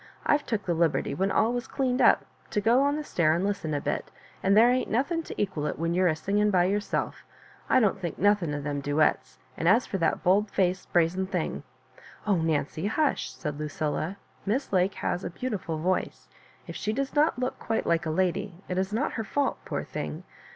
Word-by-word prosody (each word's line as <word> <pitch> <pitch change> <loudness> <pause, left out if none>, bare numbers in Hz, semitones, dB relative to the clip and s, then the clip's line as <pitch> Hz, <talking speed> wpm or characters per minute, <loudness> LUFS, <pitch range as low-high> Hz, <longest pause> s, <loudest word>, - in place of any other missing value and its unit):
I've 290 0 +2
took 210 -4 -2
the 175 - +1
liberty, 165 -2 +1
when 195 +1 0
all 220 +4 +2
was 245 +1 -3
cleaned 255 -2 0
up, - - +5 0.2
to 210 - 0
go 230 +5 +4
on 285 +1 +2
the 305 - -3
stair 165 - +2
and 175 +3 0
listen 200 -6 -2
a - - 0
bit, - - -3 0.3
and 195 +2 +3
there 235 +3 +7
ain't 255 0 0
nothing 280 +9 0
to - - -8
equal 185 -7 -1
it - - -3
when 165 +1 -1
you're 185 +1 +3
a 160 - +2
singing 205 +6 +1
by 180 -3 +3
^ - - +1
yourself. 205 0 -1 0.5
I 260 - +5
don^t 210 -4 +2
think 175 -4 -4
nothing 200 -6 +2
of 145 - -4
them 145 -1 -2
duets 145 +2 +1
— - - -32
and 165 - -1
as 230 +7 +5
for 195 - -3
that 165 - 0
bold 200 +3 +3
faced 185 -1 0
brazen 175 +2 +2
thing 180 -4 -2 0.4
^" - - -17 0.3
"Oh, 205 -3 +3
Nancy, 160 +2 -1
hush!" 290 +6 0
said 150 -1 -5
Lucilla; 155 +4 -2 0.3
Miss 230 +4 -1
Lake 185 +1 +2
has 180 - -2
a - - -3
beautiful 185 -4 -4
voice. 180 +4 -2 0.4
If - - -8
she 215 - -2
does 275 +3 -2
not 300 -1 +3
look 255 +1 -2
quite 225 - -1
like 165 -1 +1
a - - 0
lady, 185 +3 0
it 180 0 -1
is 190 +1 -1
not 235 +8 0
her 225 - -2
fault, 275 +7 -1
poor - - -3
thing. - - -5
190 Hz, 220 wpm, -27 LUFS, 165-225 Hz, 0.5 s, there